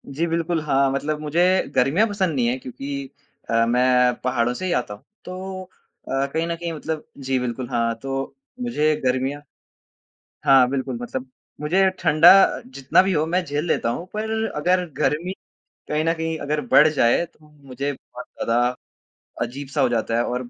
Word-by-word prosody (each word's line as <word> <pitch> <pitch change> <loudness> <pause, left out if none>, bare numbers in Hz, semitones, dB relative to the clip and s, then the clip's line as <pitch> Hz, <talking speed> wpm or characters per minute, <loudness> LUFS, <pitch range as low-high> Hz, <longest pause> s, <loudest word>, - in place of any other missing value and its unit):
जी 165 +4 +1
बिल्कुल। 165 0 -1
हाँ, 140 -2 +2
मतलब 150 +3 -2
मुझे 155 +3 0 0.3
गर्मियाँ 155 - +3
पसंद 190 -6 -1
नहीं 120 -3 +1
है 125 +2 0
क्योंकि 135 +2 -6 0.4
अ, 115 0 +3
मैं 125 +1 +3
पहाड़ों 120 -1 +1
से 185 - -5
ही 185 - -1
आता 120 -8 -1
हूँ 105 - -13 0.2
तो 185 +1 -6
अ, 135 -6 -5
कहीं 165 +1 0
न 170 - -2
कहीं 170 0 -5
मतलब 155 0 -5
जी 135 -1 -1
बिल्कुल, 125 0 -4
हाँ, 115 -2 0
तो 135 +3 -5 0.3
मुझे 155 -11 +1
गर्मियाँ 130 +3 0 1.0
हाँ 130 -2 +6
बिल्कुल, 130 -2 -3
मतलब 130 +1 -5 0.3
मुझे 185 +6 +3
ठंडा 160 0 +6 0.4
जितना 135 +6 +2
भी 190 - 0
हो 155 -3 +2
मैं 180 +2 0
झेल 145 +1 -2
लेता 160 - 0
हूँ 170 +9 -4
पर 215 +1 -3 0.3
अगर 180 +4 +2
गर्मी 165 +6 0 0.6
कहीं 150 +1 0
न 165 - +2
कहीं 160 0 -3
अगर 150 +1 -2
बढ़ 150 - +7
जाए 150 +1 +2
तो 155 -2 -23 0.2
मुझे 135 +2 -3
बहुत 125 -2 -12
ज़्यादा 115 +1 -1 0.8
अजीब-सा 140 +3 -3
हो 130 - +3
जाता 115 -1 -1
है 120 - +2
और 125 0 -3
140 Hz, 175 wpm, -22 LUFS, 125-165 Hz, 1.0 s, बढ़